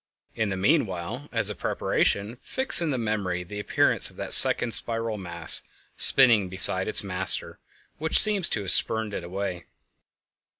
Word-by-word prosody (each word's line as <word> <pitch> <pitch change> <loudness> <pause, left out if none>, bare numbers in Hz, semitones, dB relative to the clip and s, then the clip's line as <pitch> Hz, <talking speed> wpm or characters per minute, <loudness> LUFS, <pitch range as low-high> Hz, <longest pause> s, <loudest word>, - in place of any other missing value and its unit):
In 110 -2 -5
the 95 - -7
meanwhile, 110 - -5
as - - +2
a - - -10
preparation, 105 +5 -5
fix 265 -8 -1
in 165 - -4
the 135 - -5
memory 100 -6 -6
the 105 +4 -12
appearance 105 - +1
of - - -21
that - - +1
second 125 - +6
spiral 115 -2 +2
mass 85 -3 -1 0.3
spinning 115 -8 +4
beside 95 0 +4
its 110 - +3
master 95 -1 -6 0.4
which 160 +1 -2
seems 205 -4 +1
to 105 - -5
have 95 - -5
spurned 110 -2 -1
it 90 - -8
away. 90 0 -9
105 Hz, 160 wpm, -22 LUFS, 95-120 Hz, 0.4 s, second